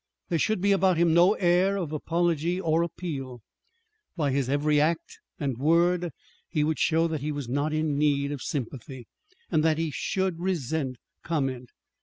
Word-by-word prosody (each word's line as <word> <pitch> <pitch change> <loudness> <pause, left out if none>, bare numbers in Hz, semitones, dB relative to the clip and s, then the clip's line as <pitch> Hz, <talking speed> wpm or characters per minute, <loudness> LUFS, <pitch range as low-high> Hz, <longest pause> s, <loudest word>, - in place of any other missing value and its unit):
There 170 - +1
should 215 0 +1
be 200 +1 +3
about 190 -3 +3
him 170 -1 +3
no 175 +4 +6
air 185 +2 +2
of 170 -6 -3
apology 170 +2 0
or 165 -2 +1
appeal. 140 -8 -5 0.7
By 145 -4 +1
his 135 -1 0
every 145 +1 +2
act 160 +2 -1 0.2
and 135 -6 -2
word 170 +4 +3 0.4
he 155 -3 +1
would 155 +1 0
show 165 0 +3
that 160 -3 -3
he 150 +2 -2
was 145 -4 -4
not 145 +5 -1
in 155 -2 0
need 140 -1 +2
of 145 -3 -5
sympathy, 130 -2 -5 0.5
and 155 - +2
that 160 -1 +3
he 165 -1 -1
should 190 +3 -1
resent 160 -7 -2 0.3
comment. 135 -6 -2
155 Hz, 170 wpm, -27 LUFS, 140-170 Hz, 0.7 s, no